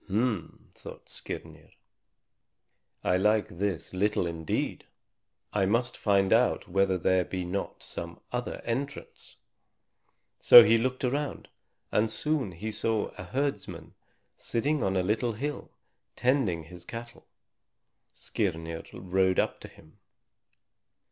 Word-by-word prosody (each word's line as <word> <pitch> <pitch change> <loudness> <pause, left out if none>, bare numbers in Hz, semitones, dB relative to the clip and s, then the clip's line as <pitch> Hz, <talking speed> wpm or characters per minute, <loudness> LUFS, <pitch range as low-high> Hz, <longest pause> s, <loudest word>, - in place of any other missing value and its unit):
"H'm!" 105 -2 -2
thought - - -12
Skirnir, - - -7 1.3
"I 90 - +3
like 105 +2 +2
this 95 -6 -2
little 100 0 +1
indeed. 80 -2 -3 0.7
I 100 -2 +2
must 120 +4 +1
find 100 -1 +3
out 120 +2 +2
whether 95 0 +2
there 90 +1 +2
be 90 0 -4
not 95 +3 -4
some 85 0 -6
other 125 0 -3
entrance." 135 +5 -5 1.0
So 120 - +11
he 115 +2 +4
looked 130 +2 -2
around, 140 +3 -2 0.4
and 110 +1 +2
soon 145 - -1
he 105 +7 -5
saw 110 0 -1
a 90 - -8
herdsman 135 -3 -3 0.4
sitting 145 +6 -1
on 95 -1 +1
a 90 - +2
little 110 +4 0
hill, 140 +6 -4 0.5
tending 120 - +1
his 90 +2 -12
cattle. 120 +5 -9 0.8
Skirnir 80 -5 -3
rode 95 0 +1
up - - +1
to - - -9
him. 80 +7 -19
105 Hz, 120 wpm, -28 LUFS, 90-120 Hz, 1.3 s, So